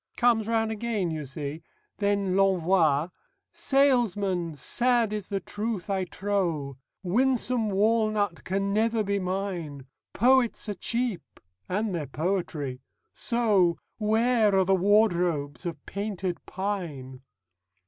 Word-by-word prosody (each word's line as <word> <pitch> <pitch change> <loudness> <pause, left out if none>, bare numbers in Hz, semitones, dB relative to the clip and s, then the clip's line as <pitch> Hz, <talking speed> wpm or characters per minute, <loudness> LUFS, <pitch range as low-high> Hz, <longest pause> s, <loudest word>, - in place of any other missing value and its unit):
_' - - -47
"Comes 235 -3 +3
round 225 -1 +1
again, 215 -5 -2
you 155 -2 -4
see! 145 +3 -6 0.4
Then 200 -2 +1
L'Envoy: 180 -5 +3 0.4
"'Salesman, 205 - +1
sad 235 - +1
is 210 -3 -4
the 200 - -2
truth 205 0 -4
I 190 -1 0
trow: 170 -9 -2 0.2
Winsome 240 +2 +1
walnut 210 -2 +1
can 195 +1 -1
never 225 +1 +2
be 200 0 0
mine. 180 -7 -4 0.3
Poets 245 0 +3
are 205 - -2
cheap. 220 - -3 0.3
And 205 +2 -1
their 155 -5 -3
poetry. 150 -4 -2 0.3
So 205 -8 +2 0.2
_Where 220 +1 +3
are 190 -1 +4
the 195 - +3
wardrobes 180 -6 +2
of 170 - -7
Painted 195 -3 -4
Pine? 165 -10 -4
195 Hz, 115 wpm, -27 LUFS, 175-220 Hz, 0.4 s, are